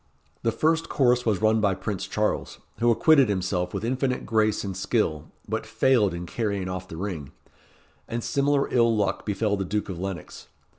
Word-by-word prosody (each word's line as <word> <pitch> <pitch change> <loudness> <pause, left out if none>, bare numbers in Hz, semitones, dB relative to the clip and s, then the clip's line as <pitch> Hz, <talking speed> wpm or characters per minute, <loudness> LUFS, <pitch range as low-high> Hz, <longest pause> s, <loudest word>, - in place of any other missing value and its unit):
The 115 - +1
first 160 +5 +1
course 125 -2 +2
was 110 -1 +1
run 110 0 +4
by 100 -3 +2
Prince 100 -2 -4
Charles, - - -1 0.2
who 120 - +3
acquitted 140 - +5
himself 95 -2 -1
with - - -3
infinite 130 +1 -1
grace 110 -2 +1
and 95 -2 -4
skill, 90 -6 0 0.2
but - - -2
failed 120 -7 +2
in 85 +1 -5
carrying 100 -1 -2
off 95 0 -5
the 80 - -8
ring; 85 -7 -5 0.8
and 115 0 -3
similar 140 0 +1
ill 115 -2 +4
luck 100 0 -1
befell 105 0 0
the 95 - -1
Duke 105 +3 -2
of 90 -3 -5
Lennox. 95 -1 -6
105 Hz, 180 wpm, -25 LUFS, 95-120 Hz, 0.8 s, acquitted